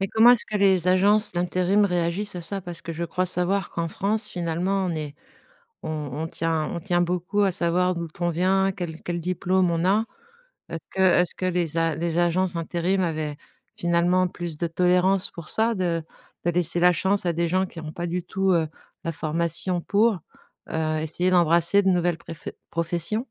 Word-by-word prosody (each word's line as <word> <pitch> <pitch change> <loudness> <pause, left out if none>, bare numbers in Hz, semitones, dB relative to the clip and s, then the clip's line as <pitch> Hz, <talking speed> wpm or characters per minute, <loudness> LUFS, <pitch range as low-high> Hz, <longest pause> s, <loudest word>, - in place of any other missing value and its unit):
Mais 195 - -1
comment 225 +4 +6
est-ce 245 - +2
que 210 - -2
les 190 -3 +3
agences 205 +4 +4
d'intérim 185 +3 +2
réagissent 180 +2 -1
à - - -4
ça? 195 +4 -2
Parce 175 -2 -7
que 165 - -5
je 170 +2 -3
crois 180 +2 -1
savoir 180 +2 0
qu'en 170 0 -2
France, 210 +5 -1
finalement, 180 +3 -1
on - - -1
est 150 -2 -5 0.7
on - - -4 0.2
on 155 +3 -3
tient 165 -1 -1
on 170 - -3
tient 175 -1 0
beaucoup 180 +3 -1
à 195 - +2
savoir 180 0 +1
d'où 170 0 -4
on 175 -1 +1
vient, 190 +3 +2
quel 175 -4 -6
quel 175 0 -3
diplôme 180 +1 +1
on 165 +1 0
a. 205 +4 +3 0.6
Est 165 - -4
ce - - -36
que 190 - -2
est 180 -1 +5
ce - - -2
que 185 - -3
les 170 -3 -1
a 165 -2 +1
les 170 +1 -2
agences 175 +1 +1
intérim 175 +3 -1
avaient 155 -4 -2 0.4
finalement 175 +1 +2
plus 175 -3 -6
de 170 - -1
tolérance 180 +3 +2
pour 170 -2 -9
ça? 225 +1 +1
De 170 -4 -1 0.4
de 175 - +3
laisser 175 0 +1
la 180 0 +6
chance 195 +2 +1
à 170 - +1
des 170 +1 0
gens 185 +2 +2
qui 170 - -10
ont 155 - -7
pas 175 0 -4
du 175 +1 -2
tout, 190 +2 0
heu, 165 -2 +2 0.4
la 165 - -1
formation 170 +3 -2
pour? 210 +1 +2 0.5
Heu, 155 -1 -1
essayer 175 +4 0
d'embrasser 170 +3 +4
de 190 - +3
nouvelles 175 -2 +1
pref 165 -1 -8 0.2
professions? 170 +4 -1
175 Hz, 200 wpm, -24 LUFS, 170-190 Hz, 0.7 s, comment